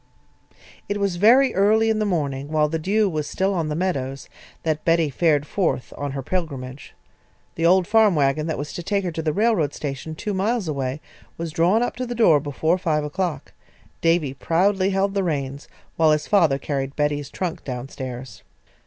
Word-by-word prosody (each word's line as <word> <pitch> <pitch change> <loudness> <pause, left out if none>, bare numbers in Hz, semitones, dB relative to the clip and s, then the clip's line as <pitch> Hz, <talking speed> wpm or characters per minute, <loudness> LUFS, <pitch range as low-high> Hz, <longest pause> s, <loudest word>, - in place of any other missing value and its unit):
It 205 0 -1
was 200 -3 0
very 245 +8 +5
early 220 +3 +3
in 220 - 0
the 215 - 0
morning, 140 -7 -2
while 155 0 +2
the 160 +2 -2
dew 205 +6 +2
was 155 -5 -2
still 190 +4 0
on 165 -4 -1
the 150 - -2
meadows, 140 -7 -3 0.3
that 155 -1 -1
Betty 165 -3 +2
fared 150 0 +2
forth 165 -6 -1
on 145 -1 -4
her 135 -1 -4
pilgrimage. 140 -6 -5 0.6
The 165 0 +1
old 185 +1 +4
farm 215 -1 +4
wagon 145 +1 +1
that 160 - -2
was 145 0 -5
to - - -5
take 200 +3 -1
her 180 - -2
to 160 - -4
the 155 -1 0
railroad 205 - +1
station, 145 +2 -5
two 210 +5 -4
miles 205 +1 0
away, 140 -1 -3 0.4
was 165 -1 -4
drawn 180 +8 +3
up - - -2
to 255 0 -3
the 240 - -4
door 175 -10 +5
before 155 +5 0
five 155 -4 0
o'clock. 170 +2 -3 0.5
Davy 165 -5 +2
proudly 185 +6 +1
held 195 0 0
the 200 -1 0
reins 140 -4 -3 0.3
while 160 -1 +4
his 150 0 +1
father 165 -9 +3
carried 135 -1 -3
Betty's 145 -1 -1
trunk 180 -3 -4
down 125 -1 -5
stairs. 125 - -8
160 Hz, 190 wpm, -23 LUFS, 145-195 Hz, 0.6 s, very